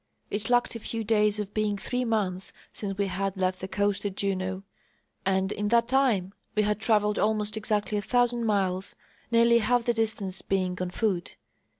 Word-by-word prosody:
It 210 +3 -3
lacked 245 0 +3
a 230 - -5
few 225 +1 -4
days 210 -1 +3
of 205 -1 -4
being 210 -1 0
three 250 +5 -2
months 195 -5 -1 0.2
since 195 -2 -3
we 200 - +1
had 195 0 -2
left 185 0 0
the 190 - -5
coast 200 +1 0
at 200 -2 -3
Juneau, 190 -1 -2 0.6
and 190 0 +1
in 210 0 -2
that 235 +1 +3
time 240 -8 +2 0.2
we 210 - +3
had 210 0 0
travelled 210 -2 +2
almost 215 0 +1
exactly 210 -1 -1
a - - -3
thousand 240 +1 +1
miles, 190 -2 0 0.3
nearly 235 0 +5
half 240 +2 +2
the 240 - +2
distance 215 -4 -1
being 185 -2 0
on 180 - -1
foot. 185 -2 -1
210 Hz, 185 wpm, -27 LUFS, 190-225 Hz, 0.6 s, nearly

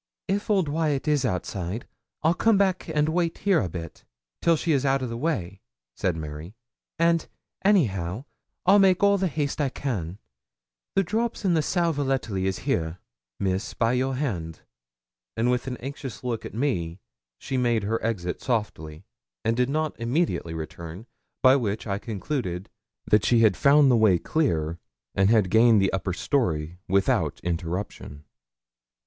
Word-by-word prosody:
'If 200 +3 -1
old 195 -6 +3
Wyat 150 -2 0
is 145 -3 +2
outside, 95 0 -3 0.4
I'll 160 +2 +4
come 220 +3 +3
back 190 -3 +1
and 150 -1 +2
wait 170 0 0
here 195 -4 +3
a 95 - -2
bit, 85 -1 -8 0.4
till 170 - +4
she's 150 -4 +1
out 135 -1 +1
o' - - 0
the 115 -1 -4
way,' 110 - -2 0.3
said 90 -3 -1
Mary; 75 +5 -7 0.4
'and, 165 0 +2 0.4
anyhow, 115 - +1 0.4
I'll 195 +3 +6
make 190 -1 +4
all 200 0 +5
the 190 - +1
haste 150 -1 -2
I 140 - +1
can. 100 - -4 0.8
The 195 - +4
drops 220 +4 -2
and 180 -3 +3
the 160 - +3
sal 170 +1 +1
volatile 135 -7 -1
is 95 0 0
here, 80 0 -1 0.4
Miss, 95 +1 -1
by 115 +1 +2
your 130 +1 0
hand.' 90 - -3 0.8
And 120 +2 +2
with 125 +1 -1
an 125 -1 -3
anxious 135 -1 -7
look 120 -3 -3
at - - -12
me, 95 - -1 0.4
she 135 - -5
made 120 -4 +1
her 110 +3 -1
exit, 90 -6 -2
softly, 95 -9 -3 0.4
and 115 - +2
did 125 +1 +1
not 155 0 -1
immediately 115 - -1
return, 85 +4 -7 0.4
by 130 0 +7
which 110 -4 -2
I 100 -2 -2
concluded 105 -4 -4 0.3
that 105 0 +3
she 120 -2 +4
had 110 -4 +5
found 140 -1 +5
the - - +5
way 105 -5 +5
clear, 85 - -1 0.3
and 95 +1 +3
had 105 -5 +3
gained 115 -1 +6
the 95 -1 +1
upper 95 -1 -1
story 85 - -1
without 95 +1 +1
interruption. 85 -3 -4
120 Hz, 160 wpm, -25 LUFS, 95-150 Hz, 0.8 s, by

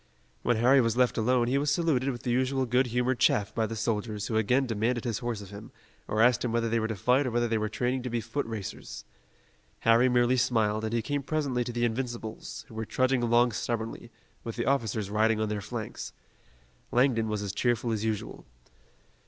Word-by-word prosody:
When 120 - +1
Harry 130 +4 +5
was 115 0 0
left 125 -1 +3
alone 120 +1 +2
he 135 +3 +2
was 145 +1 0
saluted 140 -4 +1
with 125 -2 -5
the 125 - -1
usual 130 +2 +1
good 125 +2 +2
humored 125 +1 0
chaff 100 -1 +2
by 110 -1 0
the 115 - -5
soldiers 105 -1 -2
who 110 - -3
again 125 +5 +2
demanded 115 +1 -1
his 115 -4 -2
horse 115 -4 -3
of 100 - -12
him, 100 +1 -10 0.4
or 110 +1 +2
asked 120 0 +4
him 120 - -1
whether 115 0 +1
they 115 0 +1
were 110 - -1
to 110 - -3
fight 125 +7 +2
or - - 0
whether 120 0 +1
they 115 -1 0
were 110 0 -1
training 125 +3 -1
to 125 - -4
be 120 0 -1
foot 115 +4 -3
racers. 110 -4 -7 0.8
Harry 115 +3 +5
merely 125 +1 +3
smiled, 110 -3 +1
and 110 - -3
he 115 -1 0
came 145 -1 -1
presently 140 -4 -1
to 120 - -5
the 120 0 0
Invincibles, 115 -2 -4
who - - -14
were 110 0 -3
trudging 130 +3 +1
along 120 +1 +3
stubbornly, 115 +2 -4 0.3
with 115 - -5
the 120 - -2
officers 110 -6 0
riding 110 +1 +2
on 110 -1 0
their 105 -1 -2
flanks. 110 +1 -6 0.8
Langdon 120 -3 +2
was 105 -1 -2
as 100 -1 -4
cheerful 120 +1 0
as 110 -1 -1
usual. 110 -2 -4
120 Hz, 215 wpm, -28 LUFS, 110-125 Hz, 0.8 s, Harry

